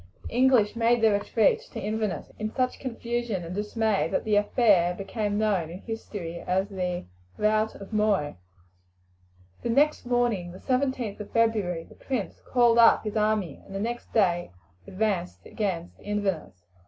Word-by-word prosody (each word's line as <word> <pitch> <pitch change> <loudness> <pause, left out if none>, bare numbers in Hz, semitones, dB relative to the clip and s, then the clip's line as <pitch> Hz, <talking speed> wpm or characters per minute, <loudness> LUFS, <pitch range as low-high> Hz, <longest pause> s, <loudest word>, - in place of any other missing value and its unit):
The - - -8
English 245 -4 +4
made 235 +1 +3
their 220 -2 +5
retreat 205 +2 +2
to - - -4
Inverness 210 -4 -3
in 215 0 -2
such 255 +2 -1
confusion 235 -5 -3
and 170 - -6
dismay 210 +1 0
that - - 0
the 215 -1 +1
affair 205 -4 +3
became 205 +2 -2
known 200 -7 +1
in 180 +4 -8
history 200 -7 -6
as 190 +2 -1
the 180 -2 -3 0.3
"rout 215 +1 +1
of 200 +2 -10
Moy." 210 -8 +1 1.3
The - - -3
next 285 +2 +2
morning, 235 -8 0
the - - -9
17th 255 -4 -1
of 210 - -7
February, 210 -7 +1
the - - -16
prince 250 -7 -4
called 240 -2 +3
up 230 - +6
his 215 -1 -4
army, 210 -7 0
and 195 - -10
the - - -2
next 235 +3 -4
day 175 -5 +2 0.4
advanced 190 -3 -2
against 180 -5 -3
Inverness. 195 - -3
210 Hz, 155 wpm, -27 LUFS, 190-230 Hz, 1.3 s, up